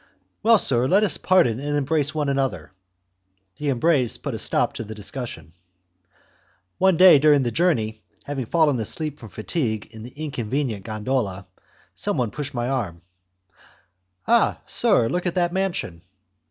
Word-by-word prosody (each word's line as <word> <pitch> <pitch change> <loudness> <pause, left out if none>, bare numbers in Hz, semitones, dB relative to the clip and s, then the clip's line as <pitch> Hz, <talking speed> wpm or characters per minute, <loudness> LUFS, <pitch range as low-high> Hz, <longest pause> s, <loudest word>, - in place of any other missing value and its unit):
"Well, 230 +1 +6
sir, 125 - +2
let 195 +8 +4
us 210 - +2
pardon 130 -11 +2
and 145 +1 -2
embrace 145 +1 0
one 150 -2 -1
another!" 135 - -2 0.9
The 150 - -2
embrace 135 -2 +2
put - - -5
a - - -4
stop - - 0
to - - -5
the 110 0 -9
discussion. 105 - -7 1.3
One 190 -2 +4
day 180 -5 +8
during 145 -1 +4
the 120 - -1
journey, 110 -9 0 0.2
having 135 -4 -4
fallen 150 -5 +2
asleep 150 +7 -4
from 110 - -11
fatigue 110 - -3
in 110 -1 -11
the 120 - -9
inconvenient 130 -6 -4
gondola, 110 -3 -2 0.5
someone 120 -4 -1
pushed 145 -2 -6
my 120 0 -1
arm. 100 -11 -3 1.3
"Ah, 235 0 +3
sir! 210 - +2
look 180 +7 -2
at 175 - -2
that 175 -1 +1
mansion!" 185 - -2
135 Hz, 150 wpm, -23 LUFS, 110-160 Hz, 1.3 s, day